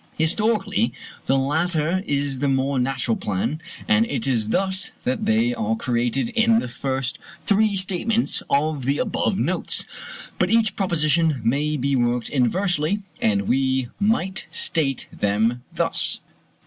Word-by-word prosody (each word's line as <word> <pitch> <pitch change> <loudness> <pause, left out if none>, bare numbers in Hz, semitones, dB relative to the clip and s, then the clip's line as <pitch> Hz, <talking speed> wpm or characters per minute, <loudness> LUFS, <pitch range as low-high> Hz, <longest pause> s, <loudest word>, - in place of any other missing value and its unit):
Historically, 210 +5 +1 0.4
the 135 - +3
latter 160 +5 0
is 140 -2 0
the 140 - 0
more 135 0 +1
natural 125 -2 0
plan, 105 - -2 0.3
and 225 -1 +4
it - - -2
is 120 -6 0
thus 190 +6 0
that 245 -4 -1
they 225 +2 +2
are 225 -2 -1
treated 125 - -1
in 230 -1 +3
the 230 - -1
first 130 +1 -3 0.3
three 210 0 +3
statements 195 +5 +1
of 145 -2 0
the 140 +2 +1
above - - 0
notes; - - +1 0.5
but - - +2
each 225 -3 +2
proposition 160 -5 +1
may 150 +5 +1
be 140 +1 0
worked 120 -1 0
inversely, 175 - 0 0.2
and 100 -2 +2
we 130 +1 0
might 195 -3 0
state 135 -5 0
them 110 +4 +1
thus: - - +2
1. - - -37
150 Hz, 140 wpm, -23 LUFS, 130-200 Hz, 0.5 s, and